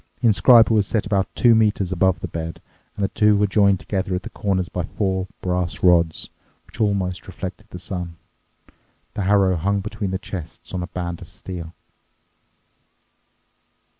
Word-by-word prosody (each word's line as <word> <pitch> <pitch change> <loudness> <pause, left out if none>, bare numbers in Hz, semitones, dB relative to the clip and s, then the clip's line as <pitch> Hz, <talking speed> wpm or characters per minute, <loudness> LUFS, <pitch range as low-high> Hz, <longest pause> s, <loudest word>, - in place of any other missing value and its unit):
The 130 - -3
inscriber 115 +2 +6
was 105 -3 +2
set 110 - 0
about 100 -3 +1
two 120 -2 +5
metres 105 -4 +2
above 95 -2 +2
the - - -3
bed, 80 0 -5 0.4
and 100 - -2
the - - +3
two 105 -1 +3
were 105 - +3
joined 100 -1 +3
together 95 -2 -2
at 90 - -4
the - - -8
corners 95 -3 -1
by 90 - -3
four 95 +2 -2
brass 90 -1 -2
rods, 85 -3 +3 0.3
which - - -8
almost 95 -4 0
reflected 95 +3 -7
the - - -8
sun. 90 -1 -5 1.0
The 100 - -2
harrow 95 -2 +4
hung 100 +4 0
between 100 -1 -4
the 95 - -1
chests 90 -4 -8
on 90 - -2
a 90 - -4
band 85 -2 -5
of - - -12
steel. 85 -3 -8
95 Hz, 165 wpm, -22 LUFS, 90-100 Hz, 1.0 s, inscriber